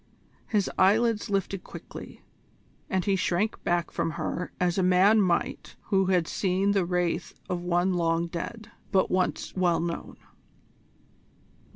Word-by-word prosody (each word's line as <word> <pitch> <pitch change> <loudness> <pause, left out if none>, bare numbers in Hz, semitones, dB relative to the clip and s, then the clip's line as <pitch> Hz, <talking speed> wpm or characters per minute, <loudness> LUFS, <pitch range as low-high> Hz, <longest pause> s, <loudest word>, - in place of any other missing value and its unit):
His 205 -4 +1
eyelids 215 +3 +3
lifted 195 -1 -1
quickly, - - -10 0.7
and 190 -2 0
he 200 - +2
shrank 190 +3 0
back 175 -1 0
from - - -1
her 180 +4 -3
as 180 +1 +1
a - - +3
man 185 +4 +5
might 175 -3 -1
do - - -30
who 190 - +4
had 180 -3 +2
seen 195 +1 +1
the 195 -3 +2
wraith 175 -1 -1
of 180 -1 -2
one 175 +1 +1
long 165 -1 +1
dead, 190 +6 -6 0.2
but 190 - +2
once 185 0 -1
well 180 -2 +2
known. 170 0 -4
185 Hz, 145 wpm, -27 LUFS, 175-195 Hz, 0.7 s, man